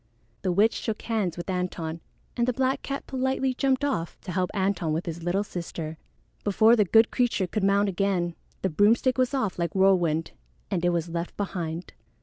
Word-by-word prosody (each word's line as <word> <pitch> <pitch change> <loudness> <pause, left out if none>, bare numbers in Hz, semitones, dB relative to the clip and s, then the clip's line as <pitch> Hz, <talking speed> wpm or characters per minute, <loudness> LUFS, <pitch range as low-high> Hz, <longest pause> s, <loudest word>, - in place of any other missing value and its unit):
The 185 - 0
witch 205 +5 +4
shook 220 -1 -4
hands 215 -7 -1
with 175 - -6
Antone, 180 -3 -3 0.4
and 240 0 +1
the 250 - +2
black 260 +2 0
cat 275 0 -4
politely 265 0 0
jumped 270 +1 +1
off 170 -13 -2
to 185 - -6
help 180 0 0
Antone 190 -5 0
with 160 +3 -2
his 170 0 -5
little 175 +4 0
sister. 170 -4 -5 0.5
Before 220 +3 +5
the 210 -3 +3
good 225 +4 +5
creature 245 -6 +1
could 200 +3 -2
mount 200 +1 +3
again, 190 -3 0 0.3
the 190 - +2
broomstick 230 - +3
was 255 +2 +2
off 215 -9 -1
like 170 0 -1
whirlwind, 175 -5 +3 0.4
and 180 -3 0
it 175 - +4
was 170 -1 0
left 170 +1 -4
behind. 175 -4 -4
195 Hz, 185 wpm, -26 LUFS, 175-225 Hz, 0.5 s, Before